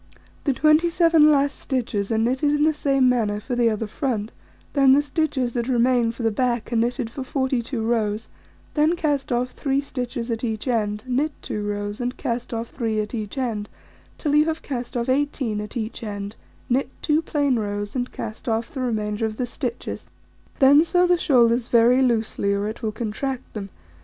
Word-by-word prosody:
The 280 - +3
27 320 +2 +4
last 280 -1 +2
stitches 230 -6 -2
are 225 - +2
knitted 255 +6 +1
in 295 - +2
the 310 0 +4
same 275 -3 +2
manner 220 -4 +1
for 245 +4 -4
the 240 -1 +3
other 220 0 -2
front; 220 -1 -2 0.4
then 275 -2 +6
the 285 - +5
stitches 285 -5 -1
that 235 -1 -1
remain 245 -2 +3
for 235 - -7
the 225 - +2
back 240 0 -1
are - - +1
knitted 235 +1 0
for 270 - -5
42 260 -2 -1
rows; 220 -2 0 0.5
then 310 +3 +3
cast 290 -6 -1
off 245 +1 0
3 275 -1 0
stitches 250 -3 -4
at 225 +1 -3
each 220 0 -3
end, 210 -3 0
knit 275 +5 +1
2 210 - -3
rows, 205 +1 -3
and 245 +1 -3
cast 240 0 -3
off 230 0 -3
3 225 -4 -1
at 210 +2 -3
each 215 +2 -4
end, 225 -5 -2 0.5
till 295 -3 -1
you 300 +1 +5
have 320 0 -2
cast 245 -3 -4
off 235 - -1
18 260 -5 0
at 210 +3 -6
each 220 0 -4
end, 205 -1 -5 0.3
knit 255 +2 +1
2 305 0 +2
plain 285 -6 +1
rows, 205 0 -3
and 245 -1 -2
cast 220 +2 -6
off 225 +1 -1
the 265 - -4
remainder 215 -2 -1
of 215 0 -7
the 250 - -1
stitches; 245 -1 -5 0.5
then 285 +1 +7
sew 355 +1 +3
the 355 0 +4
shoulders 240 -7 +3
very 240 +2 +5
loosely, 220 -5 +1
or 200 +1 -1
it 220 +2 -6
will 220 -2 -1
contract 240 +4 -4
them. 200 -2 -5
245 Hz, 190 wpm, -23 LUFS, 220-275 Hz, 0.5 s, then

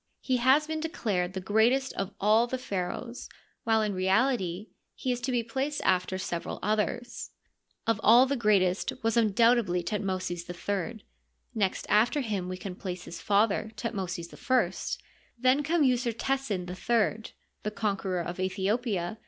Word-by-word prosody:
He 260 -1 +1
has 265 +5 +4
been 315 0 -3
declared 200 - -1
the 190 - -3
greatest 225 +7 +2
of 195 0 -3
all 215 +4 +4
the 260 - -2
pha 255 -5 -9 0.2
raohs, 240 +4 -7 0.4
while 220 -1 +3
in 210 -1 -1
reality 190 0 +1 0.3
he 255 - -2
is 245 0 -2
to 260 +2 -1
be 240 -2 +1
placed 270 +6 -2
after 185 0 +1
several 175 -2 -4
others. 215 +4 -1 0.6
Of 225 - +1
all 240 +4 +7
the 275 +1 0
greatest 200 -6 +2
was 225 +1 +1
imdoubtedly 230 -4 +3
Thutmosis 185 -4 -3
III; 200 +4 -3 0.5
next 200 -5 0
after 240 +8 +3
him 200 -7 -2
we 185 - -4
can 185 0 -6
place 180 -2 -5
his 170 - -8
father, 205 +1 +2
Thutmosis 185 -7 -4
I; 255 0 0 0.4
then 255 +4 +3
come 315 +2 +2
Usertesen 245 -5 0
III, 220 +4 0 0.3
the 210 - -2
conqueror 195 -4 -1
of 175 +1 -5
Aethiopia. 190 +1 -1
215 Hz, 150 wpm, -29 LUFS, 185-245 Hz, 0.6 s, all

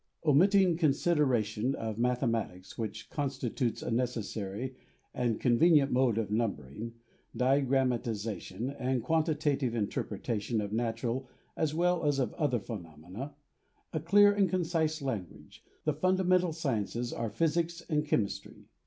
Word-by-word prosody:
Omitting 180 +4 +5
consideration 135 - +2
of 110 -1 -4
mathematics, 115 -6 -1
which 110 -1 -5
constitutes 130 -4 -2
a - - -3
necessary, 115 -1 -2 0.4
and 120 -3 0
convenient 140 +3 +4
mode 125 -3 +3
of 110 -2 -1
numbering, 110 - -2 0.4
diagrammatization 125 -4 0
and 125 -2 0
quantitative 150 -4 +1
interpreta 105 0 -2
tion 115 +2 -1
of 105 0 -3
natural 120 +2 -2 0.3
as 155 -1 0
well 175 +1 +2
as 145 -2 +2
of 130 - 0
other 145 -7 0
phenomena 95 - -8 0.3
— - - -42
a 155 - 0
clear 205 +6 +6
and 200 -2 +2
concise 165 -4 0
language 110 -10 -6
— - - -36
the 155 - +2
fundamental 185 +2 +2
sciences 120 -6 -2
are 115 -1 -2
physics 165 +7 0
and 150 -2 0
chemistry. 105 -8 -2
130 Hz, 125 wpm, -31 LUFS, 115-155 Hz, 0.4 s, clear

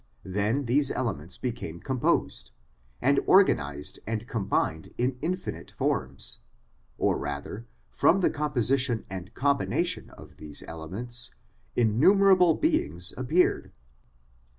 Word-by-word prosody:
Then 105 +8 0
these 135 +4 +3
elements 95 - -3
became 115 -9 -5
composed, 125 - 0 0.5
and 140 +2 +4
organised 75 - +3
and 115 +1 -3
combined 95 -8 -1
in 125 +1 0
infinite 180 +4 -3
forms; 65 -2 -2 0.6
or - - +1
rather 75 +11 -5 0.2
from 195 +3 +3
the - - +3
composition 130 -4 +1
and 95 +3 -7
combination 140 +1 0
of - - -15
these 75 -2 -5
elements 105 +10 -5 0.4
innumerable 180 - +5
beings 305 - 0
appeared. 150 +8 +1
120 Hz, 105 wpm, -27 LUFS, 90-140 Hz, 0.6 s, innumerable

